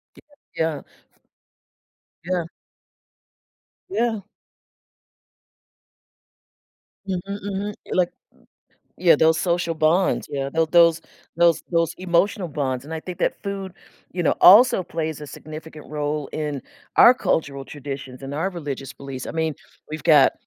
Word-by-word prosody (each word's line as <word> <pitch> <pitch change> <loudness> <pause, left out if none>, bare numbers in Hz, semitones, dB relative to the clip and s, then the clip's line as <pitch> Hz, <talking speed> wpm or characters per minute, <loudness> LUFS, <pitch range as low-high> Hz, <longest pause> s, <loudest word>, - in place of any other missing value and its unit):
Yeah, - - -17 0.3
yeah. 160 -3 -1 0.3
F - - -36 1.0
Yeah. 175 -2 -1 1.4
Yeah. 235 - 0 2.9
Mhm, 185 -2 -1 0.2
mhm, 205 +1 -3 0.2
like 180 -1 +2 0.9
yeah, 175 -4 +6
those 160 +1 +4
social 170 -1 0
bonds, 160 +4 +2
yeah, 135 -1 -2
tho 165 0 +2
those 170 0 +5 0.4
those 170 -1 +4
those 165 -1 +1
emotional 185 +1 +1
bonds, 135 -3 -2
and 160 - -9
I 160 - -4
think 180 +1 -8
that - - -1
food, 195 -2 -5 0.4
you 175 - -2
know, 160 - +3
also 205 +1 +8
plays 160 -3 -4
a 150 - -7
significant 155 +1 -10
role 150 -1 -2
in 150 -3 -3 0.3
our 245 - +9
cultural 140 - -1
traditions 135 -2 -8
and 135 +1 -6
our 165 +6 -1
religious 140 -6 -6
beliefs, 135 -2 -7
I - - -5
mean, 160 -2 -1 0.4
we've 155 - -5
got 150 -5 +6
160 Hz, 125 wpm, -23 LUFS, 145-180 Hz, 2.9 s, our